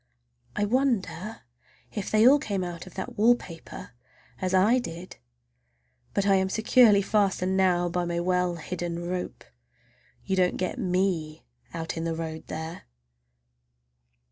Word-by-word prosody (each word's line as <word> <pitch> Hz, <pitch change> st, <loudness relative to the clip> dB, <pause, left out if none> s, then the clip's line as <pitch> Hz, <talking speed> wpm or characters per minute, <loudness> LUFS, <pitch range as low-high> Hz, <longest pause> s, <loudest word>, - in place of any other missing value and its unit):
I 210 Hz, -, +1 dB
wonder 215 Hz, -6 st, -1 dB, 0.5 s
if 205 Hz, -3 st, -4 dB
they 215 Hz, +2 st, +5 dB
all 285 Hz, +3 st, +7 dB
come 200 Hz, -7 st, -2 dB
out 175 Hz, 0 st, -6 dB
of 185 Hz, -, -13 dB
that 190 Hz, -, -6 dB
wallpaper 215 Hz, -, 0 dB, 0.5 s
as 185 Hz, -, -1 dB
I 205 Hz, +7 st, +4 dB
did? 175 Hz, -5 st, -8 dB, 1.0 s
But 200 Hz, -, +1 dB
I 195 Hz, -1 st, +4 dB
am 190 Hz, 0 st, +1 dB
securely 220 Hz, -1 st, +5 dB
fastened 190 Hz, -3 st, +1 dB
now 180 Hz, -2 st, +3 dB
by 175 Hz, 0 st, -1 dB
my 170 Hz, 0 st, -2 dB
well 180 Hz, 0 st, +1 dB
hidden 175 Hz, 0 st, -5 dB
rope—you -, -, -7 dB
don't 180 Hz, -1 st, +2 dB
get 185 Hz, +7 st, -3 dB
me 180 Hz, -6 st, -1 dB, 0.3 s
out 165 Hz, 0 st, -5 dB
in 165 Hz, -, -2 dB
the 165 Hz, -1 st, -2 dB
road 160 Hz, -1 st, -6 dB
there! 160 Hz, +2 st, -6 dB
185 Hz, 135 wpm, -27 LUFS, 170-200 Hz, 1.0 s, all